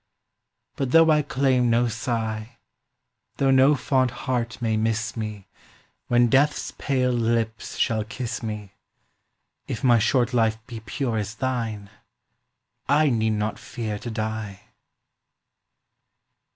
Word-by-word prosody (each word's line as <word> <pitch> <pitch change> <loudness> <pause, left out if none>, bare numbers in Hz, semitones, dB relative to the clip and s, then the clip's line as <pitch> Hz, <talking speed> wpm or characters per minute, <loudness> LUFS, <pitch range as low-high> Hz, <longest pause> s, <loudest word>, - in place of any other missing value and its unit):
But 135 -2 -1
though 165 +3 +6
I 150 -1 +4
claim 130 -3 +1
no 120 +1 +3
sigh, 115 -1 -3 0.8
Though 135 -1 +3
no 135 +2 +6
fond 130 -2 +1
heart 120 -1 -3
may 115 -2 0
miss 110 0 -1
me 105 -3 -5 0.6
When 120 0 +4
death’s 140 +4 +2
pale 130 -2 0
lips 115 -2 -1
shall 110 -2 +1
kiss 120 +2 -5
me, 105 -3 -6 0.9
If 115 - -5
my 120 -3 +5
short 120 +2 +2
life 110 -2 +2
be 120 -3 -8
pure 115 +1 -2
as 105 +2 -4
thine, 115 -5 -3 1.0
I 145 0 +4
need 110 -2 +1
not 105 +1 -2
fear 110 -4 -5
to 120 - -6
die. 110 -3 -4
115 Hz, 125 wpm, -24 LUFS, 110-130 Hz, 1.0 s, though